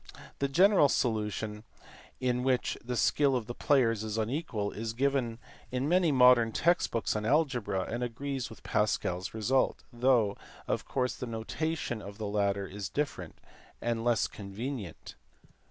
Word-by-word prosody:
The 140 - +1
general 180 +1 +5
solution 105 -3 -1 0.6
(in 125 -1 0
which 130 -1 +1
the 125 +1 -3
skill 140 +3 +3
of 120 -3 -1
the 120 - -5
players 115 -6 +2
is 110 0 -3
unequal) 110 -3 -2
is 110 +1 -4
given 130 -2 0 0.3
in 130 +2 -1
many 175 -1 +3
modern 125 -3 +6
text 175 +8 +2
books 115 - -1
on 105 - -1
algebra 125 -7 +1
and 120 +5 -4
agrees 130 +2 -3
with 110 - -13
Pascal 105 -4 0
s 95 +4 -7
result, 125 +5 +1
though 120 -4 +3 0.3
of - - -1
course 125 -2 -1
the 125 - -6
notation 120 +2 -3
of 100 0 -9
the 110 - -4
latter 100 -1 0
is 100 -1 -6
different 145 0 -3 0.4
and 115 -1 -1
less 120 -3 +2
convenient. 105 - -6
120 Hz, 155 wpm, -30 LUFS, 105-135 Hz, 0.6 s, modern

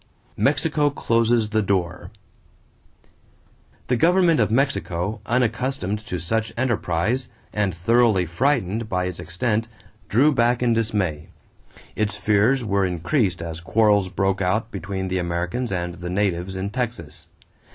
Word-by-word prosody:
=Mexico 145 -1 +2
Closes 115 -4 +1
the 110 0 +2
Door.= 90 -3 -1 1.8
The 125 - +1
government 170 +2 +4
of 110 - +3
Mexico, 110 -6 -1
unaccustomed 120 -3 0
to 90 - -3
such 110 +7 -1
enterprise 120 0 0 0.2
and 100 -4 0
thoroughly 110 +1 +3
frightened 110 - 0
by 90 -1 0
its 90 -1 -5
extent, 110 +6 -1 0.4
drew 135 +9 +4
back 120 0 +2
in 120 -1 +3
dismay. 100 -9 -1 0.7
Its 105 -2 -1
fears 110 +5 +2
were 100 -2 +1
increased 90 - 0
as 80 -1 -5
quarrels 105 +1 +2
broke 95 +1 0
out 105 +5 0
between 95 0 -4
the 95 0 -1
Americans 90 +8 -2
and 90 -2 -2
the 90 +1 -7
natives 95 -1 -1
in 95 +2 -3
Texas. 115 - -4
105 Hz, 130 wpm, -23 LUFS, 90-120 Hz, 1.8 s, government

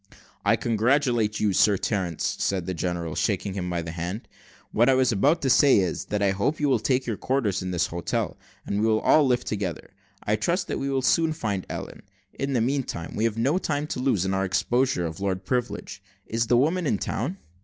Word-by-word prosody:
"I - - +4
congratulate 120 -1 +1
you, 105 -2 +1
Sir 100 +2 +4
Terence," 90 -6 -1
said 95 -3 0
the 95 - -3
general, 85 -2 -3
shaking 100 +1 -1
him 90 -2 -3
by 85 -1 -2
the 80 - -5
hand; 90 +6 -5 0.4
"what 120 +4 +3
I 130 - +5
was 130 -1 +3
about 140 - +2
to 135 - +2
say 140 +2 +6
is, 95 -3 0
that 105 -1 -1
I 100 - +3
hope 100 +11 -1
you 150 - +1
will 130 -4 +3
take 130 +4 +1
up - - -15
your 110 - -2
quarters 115 -8 0
at 95 0 -4
this 85 -1 +1
hotel, 85 +1 -2 0.3
and 100 +1 -1
we 110 - +2
will 110 -1 +2
all 155 -3 +5
live 125 -1 +1
together. 95 -6 -4 0.3
I 105 +1 +1
trust 170 - -1
we 135 - -2
shall 135 -1 0
soon 160 +3 +3
find 105 - -3
Ellen: - - -6 0.3
in 135 0 -3
the 120 - +2
meanwhile, 125 - -2
we 110 - 0
have 115 -1 -1
no 140 +10 +2
time 145 -4 -1
to - - -3
lose, 125 -8 +1
in 95 - 0
our 95 0 +1
exposure 120 +1 +1
of 80 +3 -5
Lord 95 -1 -2
Privilege. 125 +2 -3 0.2
Is 115 0 -1
the 120 - +4
woman 160 +6 +1
in 105 - +1
town?" - - -3
110 Hz, 220 wpm, -25 LUFS, 95-130 Hz, 0.4 s, say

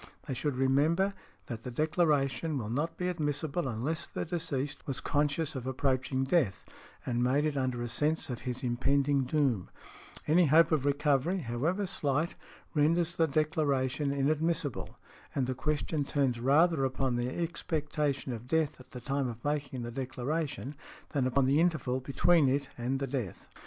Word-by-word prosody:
They 135 - -2
should 140 +2 -1
remember 150 +9 +2 0.3
that 115 -2 -6
the 125 - -6
declaration 155 +1 +1
will 110 -4 -4
not 160 +6 -1
be 180 - -1
admissible 155 -2 -1
unless 135 +8 -2
the - - -4
deceased 160 -5 -3
was 135 -2 -2
conscious 150 +1 0
of 130 -3 -5
approaching 130 0 0
death 135 - +1 0.4
and 120 -1 0
made 135 +4 +2
it 150 -1 0
under 130 -3 -1
a - - -2
sense 150 +7 0
of 120 - -4
his 125 +1 -4
impending 135 +3 +2
doom; 130 - +1 0.6
any 165 +2 +4
hope 160 +3 +6
of 150 -4 +2
recovery, 145 +4 +2
however 150 +11 -1
slight, 155 -3 0 0.4
renders 165 +3 +2
the 165 - +3
declaration 145 -2 +1
inadmissible; 150 +1 0 0.4
and 135 - +1
the 130 - -1
question 150 +2 -1
turns 135 -4 0
rather 145 +4 +4
upon 130 -1 0
the 120 +1 -1
expectation 150 -4 -2
of 120 +1 -7
death 155 0 +1
at 130 0 -15
the 125 - -8
time 135 +1 -1
of 120 +1 -7
making 140 -4 -2
the 120 - -5
declaration 135 +2 -3 0.4
than 135 -4 +1
upon 130 +1 +2
the 140 +3 +3
interval 155 -7 +1
between 145 +3 +3
it 140 +1 0
and 125 +3 -1
the 135 - -1
death. 125 -8 -4
140 Hz, 160 wpm, -31 LUFS, 130-155 Hz, 0.6 s, hope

